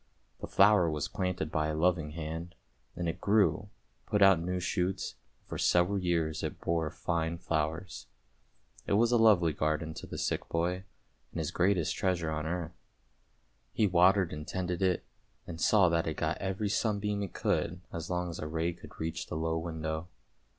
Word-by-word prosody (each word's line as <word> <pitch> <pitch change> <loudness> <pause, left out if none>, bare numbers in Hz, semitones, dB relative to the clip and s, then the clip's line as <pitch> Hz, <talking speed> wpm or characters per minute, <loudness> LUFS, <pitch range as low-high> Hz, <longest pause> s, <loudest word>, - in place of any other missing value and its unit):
The - - -6
flower 105 -5 +5
was 75 -2 -2
planted 90 -5 -2
by 75 -1 +1
a 80 - -2
loving 80 -2 +1
hand, 80 +3 -5 0.4
and 85 0 -3
it 85 +2 -3
grew, 105 0 +2 0.4
put 105 -2 +3
out 95 -3 +7
new 90 +2 -2
shoots, 90 +1 -1 0.3
and - - -36
for - - -5
several 90 +3 +3
years 85 -3 0
it - - -4
bore 80 -2 0
fine 85 +1 -2
flowers. 80 +3 -3 0.8
It - - +1
was 115 +3 +4
a 120 - +5
lovely 100 -8 +5
garden 80 +2 -1
to - - -8
the - - -6
sick - - -2
boy 90 +3 -1 0.5
and - - -8
his - - -2
greatest 90 -2 +1
treasure 90 -5 0
on 75 0 -2
earth. 85 0 -4 0.9
He 110 - +3
watered 90 -1 +4
and 75 0 -6
tended 90 -1 -2
it, 95 -2 +1 0.4
and 85 -1 -7
saw 100 -3 +5
that 85 -1 +1
it 80 - -3
got 80 0 -1
every 95 +2 -2
sunbeam 105 -1 0
it 100 - -4
could 90 +3 0
as 85 -1 -5
long 90 -1 -1
as 80 - -7
a 75 - -4
ray 80 +2 -1
could 85 - -14
reach 80 +1 -3
the - - -5
low 80 0 0
window. 80 0 -4
85 Hz, 180 wpm, -31 LUFS, 80-95 Hz, 0.9 s, out